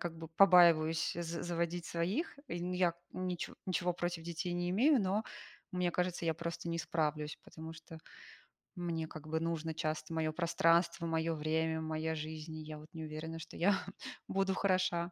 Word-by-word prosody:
как 165 -1 -4
бы 165 -1 -7
побаиваюсь 165 -3 +6
за 170 0 -3
заводить 170 0 -1
своих. 195 - -1
Э, - - -3
ну 180 +1 -2
я 180 -2 +2 0.2
ничего 180 -1 -3
ничего 180 -1 +1
против 175 -1 -2
детей 170 +2 -3
не 175 0 -1
имею, 255 +8 +5
но 200 +3 +1 0.5
мне 180 -1 +1
кажется, 180 0 -1
я 160 -1 +2
просто 170 +1 -4
не 165 0 -1
справлюсь, 150 -2 -1
потому 160 0 -8
что 165 0 -11 0.8
мне 170 -3 -2
как 155 -1 -9
бы 160 +1 0
нужно 165 -1 -1
часто 155 0 -2
моё 160 -1 0
пространство, 170 0 +3
моё 165 0 +1
время, 160 +1 0
моя 160 0 -1
жизнь. 155 +1 -5
И 155 - -6
я 155 0 -7
вот 150 +1 -12
не 160 -1 -5
уверена, 155 +1 -5
что - - -9
я 190 +3 +4 0.5
буду 195 0 +1
хороша, 185 -3 +1
165 Hz, 175 wpm, -35 LUFS, 160-175 Hz, 0.8 s, побаиваюсь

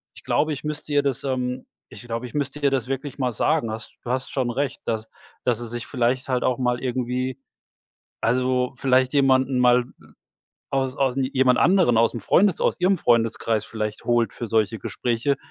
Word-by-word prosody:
ich - - -14
glaube, 155 +1 +1
ich 140 - -7
müsste 150 0 -4
ihr 145 - +4
das 140 -2 -2
ähm 130 -1 -2 0.2
ich - - -11
glaube, 115 +1 -4
ich 120 - -9
müsste 145 0 -2
ihr 140 -1 +3
das 130 -3 -1
wirklich 135 +1 -4
mal 125 -2 0
sagen. 110 +1 0
Hast 115 +1 -7
du 120 - -7
hast 130 0 -2
schon 130 -3 -1
recht, 135 +2 -2
dass 110 -1 -3 0.4
dass 120 -2 +2
sie 120 -2 -5
sich 120 0 -4
vielleicht 125 0 0
halt 130 -2 0
auch 125 - +1
mal 125 -1 0
irgendwie 125 +1 -2 0.8
also 125 +2 +1
vielleicht 130 0 +2
jemanden 130 -2 +3
mal 125 0 +4 0.9
aus 135 -1 0
aus 135 -2 +2
jemand 130 -1 +2
anderen 170 - +4
aus'm 115 0 +2
Freundes 185 - +3
aus - - +1
ihrem 185 +1 +3
Freundeskreis 115 -3 +1
vielleicht 110 -1 -5
holt 120 -1 +2
für 120 - -5
solche 110 0 +1
Gespräche 120 +3 -1
125 Hz, 185 wpm, -23 LUFS, 120-135 Hz, 0.9 s, ihr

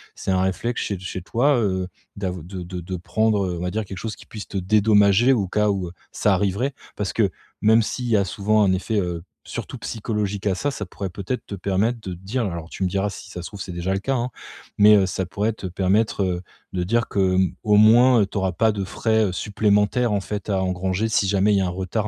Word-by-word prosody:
c'est 95 - -3
un 95 - +2
réflexe 95 +6 -1
chez 100 -3 -3
chez 95 0 -5
toi, 135 +10 +2
heu, 95 -4 0 0.3
d'av 90 -4 -3
de 90 +1 -7
de 90 0 -6
de 95 +2 -5
prendre, 105 +3 +1
heu, 90 -1 -3
on - - -5
va 90 0 -2
dire, 110 +1 -2
quelque 95 -1 -8
chose 110 +1 -4
qui - - -14
puisse 105 -2 -8
te 100 - -4
dédommager 105 +4 +4
au 105 -6 0
cas 105 +3 +1
où 95 -4 -1 0.2
ça 105 - +2
arriverait? 100 +8 0 0.2
Parce 105 -2 -2
que, 105 -5 +2 0.3
même 110 +2 +5
s'il 125 +3 -3
y 110 - +4
a 100 - +2
souvent 105 +3 +1
un 95 -2 +3
effet, 100 +3 0
heu, 85 -2 -3 0.2
surtout - - -6
psychologique 105 -3 -3
à 95 - +2
ça, 145 +9 -1
ça 105 - -5
pourrait 95 +1 -5
peut-être 100 +7 -4
te 100 - -6
permettre 100 +5 0
de 95 -3 -5
te - - -9
dire- 115 +7 -2
alors 85 -3 -5
tu - - -10
me 95 - +2
diras, 100 +2 0
si 100 - -9
ça 90 - -7
se 85 - -6
trouve, 100 - -10
c'est 95 - -6
déjà 85 +2 -2
le 95 - 0
cas, 135 +6 -1
hein- 120 0 -1 0.5
mais, 105 +1 +8
heu, 95 - +3
ça 95 +1 -2
pourrait 105 +5 -1
te 100 - -6
permettre, 100 +3 +1
heu, 90 -2 -1 0.3
de 90 -1 -1
dire 115 +6 +1
que, 95 -2 +2
hem, 95 -1 +2
au 105 -1 +4
moins, 115 +1 +6
tu 100 +1 -7
auras 95 -2 0
pas 110 +5 +3
de 100 -2 -3
frais, 110 +3 +1
heu, 95 - -1
supplémentaires, 105 +4 +1
en 100 - +1
fait, 105 +1 -5
à 95 -1 +1
engranger, 95 +3 -1
si 110 -2 +2
jamais 100 +1 +3
il - - +4
y - - +3
a - - +1
un - - -1
retard 95 +4 -2
100 Hz, 255 wpm, -23 LUFS, 95-110 Hz, 0.5 s, mais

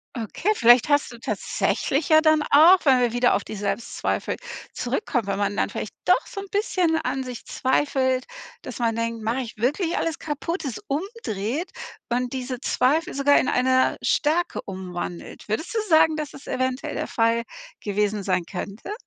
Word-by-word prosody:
Okay, 235 - -1
vielleicht 240 - +5
hast 290 -2 +2
du 235 - -10
tatsächlich 275 +5 -1
ja 315 0 +7
dann 310 -1 +4
auch, 320 +6 +8
wenn 265 -3 +5
wir 240 -2 +1
wieder 245 0 +3
auf - - 0
die - - -7
Selbstzweifel 205 +3 -2 0.4
zurückkommen, 250 - -2
wenn 200 0 -2
man 205 0 0
dann - - 0
vielleicht - - -5
doch - - +3
so 425 - -7
'n 395 - -6
bisschen 365 -5 +1
an 270 -4 -2
sich 250 -2 -8
zweifelt, 260 -1 +1 0.4
dass - - -8
man 230 -2 0
denkt: 230 -1 -3
„Mache 235 +4 0
ich 230 -3 -8
wirklich 300 - 0
alles 325 -3 -2
kaputt?“, 320 +2 -4
es 255 - -3
umdreht 295 - -3 0.4
und 245 +1 -1
diese 255 -1 -4
Zweifel 280 +5 +1
sogar 285 +1 +4
in - - 0
eine 260 +1 +2
Stärke 320 +4 +1
umwandelt. 180 -2 -6
Würdest 265 - -2
du 455 - +1
sagen, 315 -1 +5
dass 305 -2 -5
es 280 - -12
eventuell 260 0 -2
der - - -3
Fall 230 0 +1 0.4
gewesen 210 0 0
sein 180 -2 0
könnte? 200 - -6
260 Hz, 175 wpm, -24 LUFS, 230-310 Hz, 0.4 s, auch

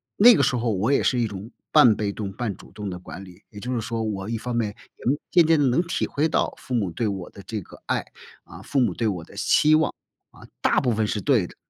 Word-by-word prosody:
那 240 +4 +8
个 140 - +2
时 130 - +2
候 120 -1 0
我 105 +6 0
也 - - +3
是 125 - +2
一 115 - +1
种 105 +2 -8 0.2
半 110 -3 +7
被 100 -1 -2
动 100 -2 -5
半 105 -2 -3
主 - - -16
动 105 -2 -6
的 90 -1 -6
管 95 +2 -9
理， 90 +1 -15
也 105 - -10
就 125 +4 -4
是 115 - -1
说， 115 0 -3
我 105 -1 -3
一 115 - -1
方 120 +1 -4
面 115 -3 0 0.3
也 - - -16 0.3
渐 175 -2 +6
渐 160 -1 +4
地 145 - +3
能 125 +8 +3
体 170 - -1
会 155 +3 0
到， - - 0
父 130 - -8
母 100 -7 0
对 110 +7 -1
我 95 -3 -5
的 100 - -12
这 110 - -4
个 - - -15
爱， - - 0 0.4
啊， 85 +4 -12
父 140 +6 -1
母 125 - +2
对 115 - -1
我 90 -5 -4
的 - - -16
期 155 +1 +3
望， 160 +1 +1 0.4
啊， - - -16 0.2
大 - - +3
部 125 -3 +1
分 110 0 0
是 105 - -1
对 110 -7 +2
的。 - - -16
110 Hz, 295 characters per minute, -24 LUFS, 100-125 Hz, 0.4 s, 那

